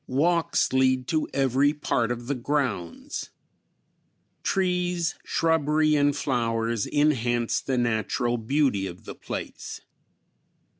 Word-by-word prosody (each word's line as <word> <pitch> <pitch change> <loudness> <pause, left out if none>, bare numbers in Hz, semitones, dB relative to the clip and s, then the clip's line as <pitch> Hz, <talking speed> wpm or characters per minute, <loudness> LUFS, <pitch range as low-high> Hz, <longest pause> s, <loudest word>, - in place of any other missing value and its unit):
Walks 165 +5 +1
lead 130 -1 +2
to 155 -1 0
every 135 +2 +2
part 120 -5 0
of 120 0 -4
the 140 - -1
grounds. 125 - -2 1.1
Trees, 180 -2 0
shrubbery 155 -1 +2
and 145 -1 +3
flowers 115 -5 0
enhance 120 -6 +1
the 130 -2 -1
natural 120 +1 0
beauty 115 -5 +1
of 90 -1 -10
the - - -6
place. - - -6
130 Hz, 105 wpm, -26 LUFS, 120-150 Hz, 1.1 s, and